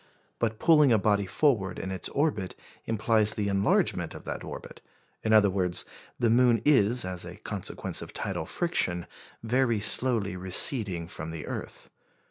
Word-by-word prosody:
But 110 -2 -1
pulling 150 -3 +4
a 115 - +5
body 100 -1 0
forward 100 -9 0
in 95 - -5
its 95 -2 -4
orbit 140 -11 -2 0.3
implies 110 -1 +1
the 105 -1 -2
enlargement 100 0 0
of - - -10
that - - -6
orbit; - - -10 0.4
in 110 - -2
other 105 -3 +5
words, 90 -2 0 0.3
the 115 -2 +1
moon 120 -1 +4
is, 125 -6 +4
as 90 -1 -4
a - - -9
consequence - - -3
of - - -8
tidal 80 - -5
friction, 90 - -1 0.4
very 120 -1 +1
slowly 110 -3 +3
receding 95 -1 +2
from 80 -3 -7
the 80 -1 -7
earth. - - -8
105 Hz, 155 wpm, -27 LUFS, 95-120 Hz, 0.4 s, a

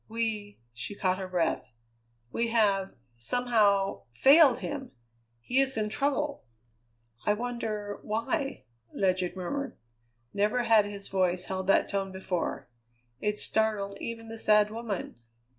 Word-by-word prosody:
We" 220 -2 -3 0.2
she 120 - -6
caught 185 -1 0
her 190 - -4
breath 175 -9 -1 0.6
"we 235 - 0
have, 205 -4 +2 0.2
somehow, 205 - +2
failed 275 - +7
him. 270 -3 -5 0.5
He 250 - +1
is 270 -3 +2
in 210 -1 0
trouble." 285 +4 -1 0.8
"I 210 - +3
wonder 215 -3 -4
why?" 270 +7 -2 0.3
Ledyard 185 -2 +1
murmured. 275 +10 -4 0.6
Never 210 +5 +1
had 220 -3 +5
his 200 -1 -7
voice 185 -1 0
held 190 -1 -4
that 195 - +4
tone 195 -1 -2
before. 190 -2 -3 0.5
It 210 0 -1
startled 210 -3 0
even 230 -1 -5
the 225 0 -8
sad 210 -1 +4
woman. 225 - -4
210 Hz, 125 wpm, -29 LUFS, 195-235 Hz, 0.8 s, failed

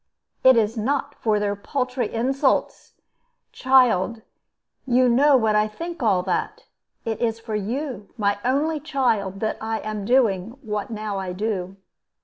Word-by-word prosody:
"It 260 -2 +7
is 225 +1 +1
not 280 +5 -1
for 215 -5 0
their 205 0 -1
paltry 250 +2 -2
insults. 260 +4 0 0.6
Child, 235 -5 +3 0.6
you 250 0 +4
know 270 +4 +5
what 220 -3 +1
I 210 0 +3
think 335 +10 -7
all 195 -6 +2
that. 185 -1 -2 0.4
It 225 -1 -3
is 225 -1 0
for 225 -1 -7
you, 225 +1 -4
my 205 -2 0
only 295 +5 +1
child, 235 -10 -1
that 220 - -1
I 220 0 -2
am 215 -1 -4
doing 225 -2 +1
what 210 -3 -3
now 215 -3 -4
I 185 -1 -4
do." 195 -2 -3
225 Hz, 145 wpm, -23 LUFS, 210-260 Hz, 0.6 s, It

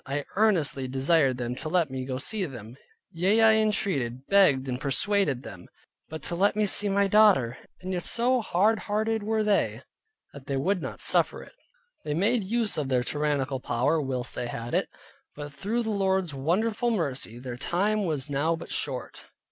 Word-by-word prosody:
I 140 +1 -3
earnestly 170 -11 +1
desired 135 0 +2
them 120 -1 -3
to 155 - -5
let 165 -4 +1
me 130 -1 -4
go 130 - -4
and 130 - -4
see 215 -3 -2
them: 120 -6 -10 0.4
yea, 190 +6 +2
I 220 0 +7
entreated, 140 - -1
begged, 150 -10 +4
and 125 +1 -4
persuaded 145 -1 +1
them, 90 -7 -11 0.4
but 160 0 -8
to 170 - -2
let 195 +3 +2
me 210 0 +2
see 205 +1 +4
my 200 0 +2
daughter; 195 - +4 0.2
and 185 +1 -4
yet 175 - -2
so 245 +4 +2
hard 210 +2 +2
hearted 220 +1 -1
were 215 +1 0
they, 210 -1 0 0.5
that 140 -1 -12
they 140 - -1
would 185 +7 0
not - - -5
suffer - - +2
it. - - -16 0.5
They 150 - -3
made 215 +6 +2
use 225 -2 0
of 140 -3 -3
their 125 -2 +1
tyrannical 145 -1 -1
power 135 +6 0
whilst 130 -3 -3
they 120 - -4
had 120 0 -6
it; - - 0 0.5
but 145 -1 -8
through 215 +10 -2
the 220 - -2
Lord's 190 -5 0
wonderful 210 - 0
mercy, 140 - -2
their 125 0 -7
time 205 - 0
was 150 -7 -2
now 145 +4 0
but 165 - -10
short. - - -4
165 Hz, 190 wpm, -26 LUFS, 135-205 Hz, 0.5 s, I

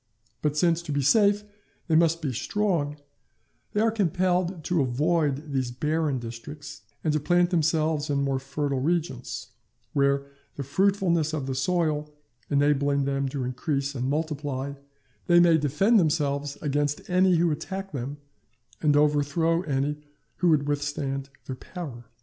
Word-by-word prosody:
But 150 0 0
since 170 0 +3
to 170 - -6
be 145 -1 0
safe 205 - +4 0.4
they 165 - 0
must 165 0 +3
be 135 -4 -1
strong, 165 - -1 0.8
they 210 - +2
are 225 0 +3
compelled 180 -3 0
avoid 150 0 +1
these 130 -2 0
barren 150 +3 0
districts, 120 0 -8 0.2
and 155 - +1
to 155 - +2
plant 175 +4 +2
themselves 155 -2 +1
in 140 -1 +1
more 135 -1 0
fertile 140 0 -2
regions; 150 -4 -2 0.4
where, 140 -1 +2 0.3
the 140 - -4
fruitfulness 170 0 +1
of 150 -4 -2
the 135 - -2
soil 150 +1 0 0.4
enabling 140 -1 +2
them 140 0 0
to 135 -1 -3
increase 135 +2 -2
and 130 -1 -2
multiply, 145 -3 -2 0.5
they 175 0 +6
may 170 -2 +5
defend 165 - +3
themselves 145 -3 0
against 145 0 -1
any 185 0 +4
who 170 0 +3
attack 190 +6 -5
them, 140 +1 -4 0.6
and 150 -2 +4
overthrow 150 +3 +2
any 145 -2 -1 0.4
who 180 - +2
would 150 -3 +3
withstand 140 -2 -2 0.2
their 130 - -5
power. 135 -8 -8
150 Hz, 145 wpm, -26 LUFS, 140-170 Hz, 0.8 s, they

